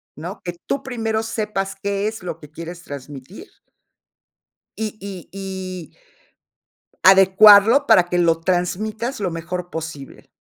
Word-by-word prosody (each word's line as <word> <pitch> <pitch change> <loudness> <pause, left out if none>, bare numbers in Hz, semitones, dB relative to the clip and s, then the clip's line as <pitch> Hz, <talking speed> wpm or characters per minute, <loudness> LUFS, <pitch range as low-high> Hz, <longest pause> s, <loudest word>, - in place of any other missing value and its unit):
¿No? 175 +7 -8
Que 175 - -4
tú 275 - -2
primero 225 -4 -2
sepas 210 -3 -3
qué 200 0 -1
es 220 -3 -6
lo 170 -2 -6
que 150 - -13
quieres 170 +3 -9
transmitir. 145 - -10 1.3
Y 220 0 -2
y 195 -3 -9
y 190 -2 -7 1.2
adecuarlo 200 +7 +7
para 220 -8 +6
que 175 0 -3
lo 170 -2 +3
transmitas 210 +8 -2
lo 195 -3 -1
mejor 175 +2 -5
posible. 160 -5 -8
190 Hz, 125 wpm, -21 LUFS, 170-215 Hz, 1.3 s, adecuarlo